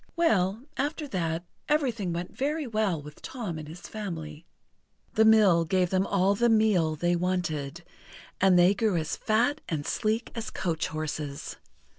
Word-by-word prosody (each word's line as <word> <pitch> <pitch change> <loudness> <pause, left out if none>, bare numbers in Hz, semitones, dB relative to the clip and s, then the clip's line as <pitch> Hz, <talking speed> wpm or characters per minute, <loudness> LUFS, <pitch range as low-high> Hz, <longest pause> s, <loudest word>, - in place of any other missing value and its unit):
Well, 220 - +2
after 295 +3 -2
that 165 -4 -2 0.3
everything 245 - +1
went 170 +1 -5
very 300 +3 -1
well 215 -8 0
with 150 0 -12
Tom 205 -11 -5
and 155 - -8
his 165 +4 -10
family. 165 -8 -7 0.7
The 220 - +4
mill 210 -6 +6
gave 180 +1 +1
them 190 +1 +2
all 195 0 +3
the 235 +4 +2
meal 210 -8 +3
they 175 +3 +1
wanted, 170 -4 -2 0.6
and 190 -1 +5
they 175 +2 +6
grew 205 -3 +1
as 160 -1 -2
fat 245 +7 +1
and 150 -3 -2
sleek 220 +2 -1
as 230 - -4
coach 165 -3 -2
horses. 150 -2 -5
185 Hz, 155 wpm, -28 LUFS, 165-220 Hz, 0.7 s, mill